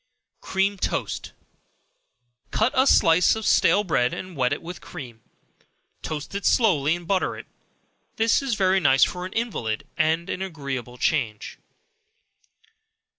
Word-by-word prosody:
Cream 195 +1 0
Toast. - - -3 1.2
Cut 220 +4 +1
a 260 +1 +4
slice 165 -3 +5
of 220 -1 -5
stale 205 - +4
bread, 125 -10 0
and 185 -2 -8
wet 125 -3 +1
it - - -3
with 175 +2 -8
cream; 125 -9 -10 0.8
toast 150 +2 -6
it 200 0 -4
slowly 165 - +3
and 175 -1 -10
butter 190 -1 0
it; - - -9 0.7
this 225 +3 +2
is 270 -5 -1
very 190 -1 +2
nice 135 -6 +4
for 180 0 -1
an 185 - -13
invalid, 185 - -3
and 160 +2 +1
an 185 - -4
agreeable 140 -9 -5
change. 115 -7 -2
175 Hz, 135 wpm, -24 LUFS, 140-200 Hz, 1.2 s, slice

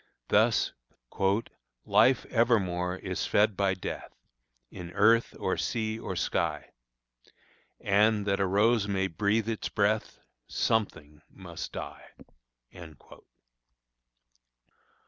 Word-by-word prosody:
Thus, - - +3 1.1
"Life 130 0 +4
evermore 95 -7 +1
is - - -4
fed 105 0 +2
by 95 -1 +1
death, 90 - -6 0.6
In 90 -2 -8
earth, 115 +4 +3
or - - -1
sea, 110 -1 -2
or - - -5
sky; - - -2 1.1
And, 105 +1 +2
that 100 -1 0
a 100 - +1
rose 105 +3 +2
may 95 -1 0
breathe 100 +5 0
its 115 -2 -3
breath, 105 +1 0 0.3
Something 80 -9 -2
must 85 -4 -8
die." - - -9
100 Hz, 95 wpm, -28 LUFS, 95-110 Hz, 1.1 s, Life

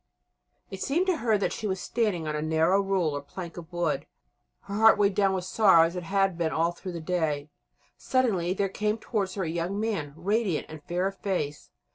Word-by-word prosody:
It 190 -1 -7
seemed 335 +7 +1
to 370 -3 +1
her 225 -2 +2
that 200 - -1
she 215 - -3
was 190 -1 -2
standing 205 -9 -1
on 150 - -2
a 150 - -2
narrow 160 +5 +3
rule 190 -6 0
or 145 - -3
plank 170 +4 -8
of 170 -1 -10
wood, 175 -3 -1 0.5
her 200 - -8
heart 220 +1 +6
weighed 200 -1 +3
down 195 0 +3
with 180 -1 -3
sorrow 185 -4 +5
as 165 +2 -1
it 180 - -3
had 195 0 0
been 165 -2 +1
all 165 +1 +1
through 180 +1 -8
the 170 - -4
day. 155 -4 -1 0.5
Suddenly 200 -9 +1
there 200 0 +1
came 210 +3 -1
towards 200 -5 -2
her 195 - -1
a - - -2
young 170 +5 -2
man 200 -10 -2
radiant 195 0 0
and 155 -1 -9
fair 175 +4 -1
of 195 0 -3
face. 150 -7 -3
185 Hz, 215 wpm, -27 LUFS, 165-205 Hz, 0.5 s, heart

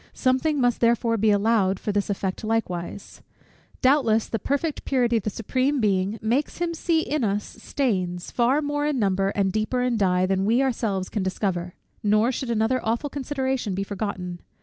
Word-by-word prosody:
Something 270 +3 +1
must 245 -2 +1
therefore 230 0 +3
be 220 0 +2
allowed 205 -2 +2
for 210 - -2
this 205 0 -1
effect 195 0 -2
likewise. 200 -4 -3 0.6
Doubtless, 255 -5 +3
the 225 - -2
perfect 285 - -2
purity 245 -3 +2
of - - -1
the - - +1
Supreme 255 +7 0
Being 200 -1 +1
makes 250 +7 0
him 345 -1 -1
see 325 0 +1
in 300 -3 -1
us 205 -1 0
stains, 185 -10 -2
far 255 +5 +2
more 290 0 -1
in 295 -2 0
number 195 -3 +1
and 195 -2 +1
deeper 220 +5 0
in 250 -2 +1
dye; 185 -3 +2
than 190 0 0
we 230 +6 +3
ourselves 215 -7 -1
can 210 - -3
discover. 185 -2 -2 0.3
Nor 215 +4 +3
should 260 0 -4
another 230 +2 +1
awful 235 +6 -1
consideration 265 -6 -2
be 195 - -1
forgotten. 190 -3 -4
225 Hz, 175 wpm, -24 LUFS, 195-260 Hz, 0.6 s, therefore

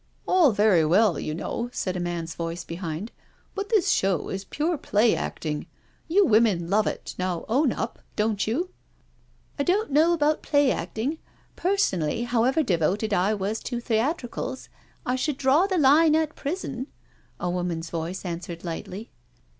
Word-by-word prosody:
" - - -36
All 350 -7 +5
very 205 -5 +4
well, 180 +2 +3
you 155 - -3
know/' 235 +7 -3
said 185 -6 -2
a - - -2
man's 170 -2 -3
voice 170 +1 -4
behind, 170 +4 -5 0.2
" - - -36
but 400 0 -4
this 430 -7 +3
show 190 -3 +1
is 195 0 -4
pure 315 - -1
play 225 -5 +2
acting. 150 -2 -4 0.4
You 385 +5 +4
women 210 -6 +3
love 215 +1 +3
it— - - -4
now 180 -2 -2
own 265 +4 +2
up, 225 - -4 0.2
don't 210 -1 0
you?" 330 +12 -1 0.4
" - - -34
I - - +2
don't 390 +3 +1
know 310 +4 +5
about 305 -2 +2
play 285 -3 +3
acting 275 +9 -3 0.2
— - - -35
personally, 230 - +1
how 240 -1 +1
ever 270 +5 +2
devoted 195 - 0
I 200 +3 +2
.was 205 +2 -2
to 240 -2 -4
theatricals,* 245 +2 -2 0.4
I 250 - +1
should 260 +2 -1
draw 285 +8 +3
the 375 -2 0
line 305 +2 +5
at 315 -1 0
prison," 275 -5 -4 0.5
a 175 - -2
woman's 175 -2 -3
voice 170 +3 -4
answered 170 -1 -5
lightly. 185 +5 -6
225 Hz, 170 wpm, -25 LUFS, 180-290 Hz, 0.5 s, All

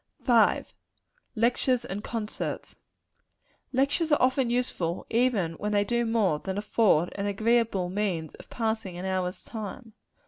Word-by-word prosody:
V. 235 -4 +4 0.7
Lectures 245 +2 +2
and 205 -1 -5
Concerts. 220 -2 -4 1.0
Lectures 280 +5 +1
are 295 - +5
often 260 -1 +2
useful, 215 -8 -1
even 225 -8 +2
when 210 0 -2
they 205 0 +3
do 235 +3 0
no 225 - -2
more 200 -10 +2
than 190 +3 -4
afford 205 -5 +2
an 200 0 -3
agreeable 215 -2 +1
means 180 -5 -2
of - - -14
passing 220 -6 -2
an 180 - -5
hour's 185 -1 -2
time. 220 +1 -7
215 Hz, 140 wpm, -27 LUFS, 190-240 Hz, 1.0 s, are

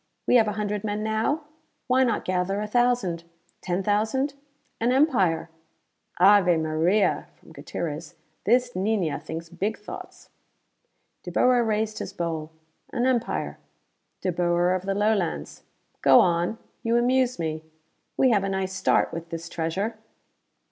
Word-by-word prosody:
We 250 - +5
have 225 -2 +4
a 210 - -1
hundred 210 -1 -2
men 210 0 -2
now? 220 +8 0 0.4
Why 260 +1 +3
not 235 -4 0
gather 185 +2 0
a 210 - -2
thousand? 225 -7 +1 0.4
Ten 180 +1 -2
thousand? 220 +8 +1 0.5
An 235 +2 +2
empire!" 195 - +2 0.7
"Ave 185 -2 +6
Maria," 160 +6 +1
from - - -19
Gutierrez. 160 +1 -6 0.3
"This 245 +4 +3
niña 190 -5 0
thinks 165 +1 -7
big 200 +6 -2
thoughts!" 210 - -10 0.9
De - - -7
Boer 250 -1 +4
raised 215 -1 -1
his - - -6
bowl. 160 -2 -3 0.4
"An 240 - 0
empire 250 -3 -1 0.6
De 185 - 0
Boer 175 +1 +2
of 185 +1 -3
the 195 - 0
Lowlands! 205 -4 -1 0.4
Go 135 -1 +7
on; 175 +4 +2 0.2
you 230 +1 +1
amuse 250 +1 +2
me. 160 -2 -3 0.5
We 260 - +4
have 205 -3 +3
a 195 - -1
nice 190 -1 -2
start, 185 - +2
with 165 0 -6
this 165 0 -6
treasure." 195 +7 -2
200 Hz, 140 wpm, -25 LUFS, 175-225 Hz, 0.9 s, Go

